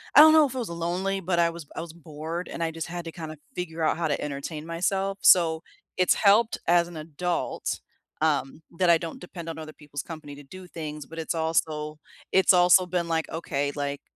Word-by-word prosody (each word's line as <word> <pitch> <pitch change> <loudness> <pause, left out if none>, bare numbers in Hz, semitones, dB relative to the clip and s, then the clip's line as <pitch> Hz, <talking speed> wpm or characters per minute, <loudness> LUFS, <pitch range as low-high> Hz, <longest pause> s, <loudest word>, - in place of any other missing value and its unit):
I - - +10
don't 315 +1 +10
know 310 -2 +7
if 265 - -4
it - - -3
was 235 -7 -3
lonely, 180 +4 -2
but 175 0 0
I 170 0 +4
was 170 -2 -8
I - - -4
was 165 -1 -8
bored, 165 +1 -6
and - - -6
I 165 - -1
just 165 -1 -5
had 175 0 -6
to 165 - -5
kinda 155 -2 -8 0.2
figure 165 -2 -4
out 155 - +2
how 165 -2 0
to 145 - -1
entertain 150 +2 -5
myself, 195 +4 -1
so, 165 -2 +5 0.3
it's 185 - +4
helped 215 +3 +4
as 170 0 +4
an 170 -2 -9
adult, 165 +3 -3 0.4
um, 155 -1 0 0.2
that 180 - +4
I 170 - +7
don't 165 0 -7
depend 175 -2 -9
on 160 - -6
other 155 -1 -8
people's 145 -2 -7
company 155 -3 -9
to 145 - -12
do 185 +6 -11
things, 150 -4 -6
but 165 +2 -9
it's 165 +1 -2
also 155 -2 -1 0.3
it's 190 +1 +5
also 180 +1 +6
been 175 -1 -1
like, 160 -1 -1
"Okay." 145 -3 -2
Like, 145 -1 -3
165 Hz, 220 wpm, -26 LUFS, 155-180 Hz, 0.4 s, I